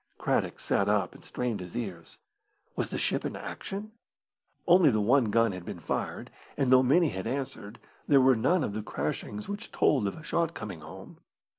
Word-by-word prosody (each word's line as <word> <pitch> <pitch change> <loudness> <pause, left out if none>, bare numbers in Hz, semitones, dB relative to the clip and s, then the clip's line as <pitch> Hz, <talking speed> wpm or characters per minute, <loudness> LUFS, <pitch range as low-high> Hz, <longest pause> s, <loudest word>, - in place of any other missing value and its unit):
Craddock - - 0
sat 100 0 +1
up 105 -4 +1
and - - -15
strained 120 -4 -3
his 90 +5 -7
ears. 95 -8 -6 0.6
Was - - -2
the - - -3
ship - - 0
in - - -3
action? 205 +2 -6 0.7
Only 175 -3 +6
the 110 -4 +2
one 120 +5 +4
gun 115 +1 +3
had 90 -2 -7
been - - -7
fired, - - -4 0.3
and 135 -3 +1
though 130 0 +8
many 150 +6 +4
had 95 -5 -4
answered, 125 -5 -4 0.3
there 140 -2 +6
were 130 0 +5
none 170 +9 +2
of 100 - -2
the 110 - -3
crashings 105 0 -4
which 205 +3 -6
told 130 -9 +2
of 100 - -4
a 160 - -11
shot 170 +1 -1
coming 105 -6 -6
home. 85 +5 -11
120 Hz, 190 wpm, -29 LUFS, 100-145 Hz, 0.7 s, though